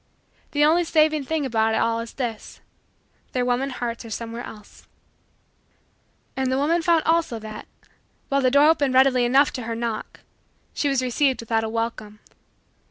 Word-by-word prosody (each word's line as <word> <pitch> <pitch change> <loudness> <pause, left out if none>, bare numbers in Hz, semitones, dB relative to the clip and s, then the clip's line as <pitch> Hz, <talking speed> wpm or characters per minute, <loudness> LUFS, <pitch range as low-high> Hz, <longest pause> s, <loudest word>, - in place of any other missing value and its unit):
The 295 0 +4
only 335 +3 +4
saving 310 -3 +2
thing 315 0 -1
about 225 -3 +1
it - - +1
all 230 0 +1
is 230 0 -7
this: 235 -5 -5 0.7
their 250 -1 0
woman 250 +2 0
hearts 240 -2 -5
are 230 - -10
somewhere 230 +2 -6
else. 210 -1 -13 1.5
And 265 -1 -1
the 260 - +1
woman 325 +5 +1
found 330 -1 +2
also 325 -7 +1
that, 215 -1 -9 0.6
while 275 -1 +1
the 255 - +3
door 285 +3 +5
opened 285 -5 +2
readily 260 -2 +4
enough 270 +4 +3
to 255 - -5
her 230 0 -4
knock, 230 -2 -5 0.5
she 290 - 0
was 270 -2 0
received 260 +2 +1
without 225 -1 0
a 220 - -3
welcome. 225 -2 -4
255 Hz, 165 wpm, -23 LUFS, 230-285 Hz, 1.5 s, door